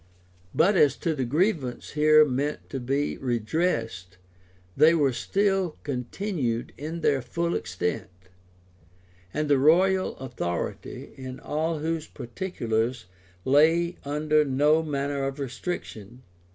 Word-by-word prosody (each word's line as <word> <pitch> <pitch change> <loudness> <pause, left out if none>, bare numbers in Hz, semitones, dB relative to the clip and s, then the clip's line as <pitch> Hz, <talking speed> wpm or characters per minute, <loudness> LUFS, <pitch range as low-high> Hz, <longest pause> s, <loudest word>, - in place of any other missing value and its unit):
But 190 +6 +4
as 150 -6 +4
to 165 - -1
the 135 -4 -2
grievances 150 - -1
here 155 +1 +6
meant 140 +2 -3
to 135 - -3
be 135 +4 -1
redressed, 115 - -1 0.6
they 160 +2 +6
were 140 -5 +2
still 195 +2 0
continued 130 - -3
in 160 +3 -6
their 140 -2 +2
full 170 +8 -2
extent; 90 +2 -3 1.2
and 150 0 -1
the 140 -2 +4
royal 185 +6 +3
authority, 120 -10 -5
in 130 -1 -8
all 160 +2 -2
those 160 +1 -2
particulars, 120 - -3 0.4
lay 165 +5 +3
under 150 +1 +2
no 145 +3 +3
manner 140 -2 -2
of 135 +1 -3
restriction. 125 - -6
145 Hz, 115 wpm, -26 LUFS, 125-160 Hz, 1.2 s, here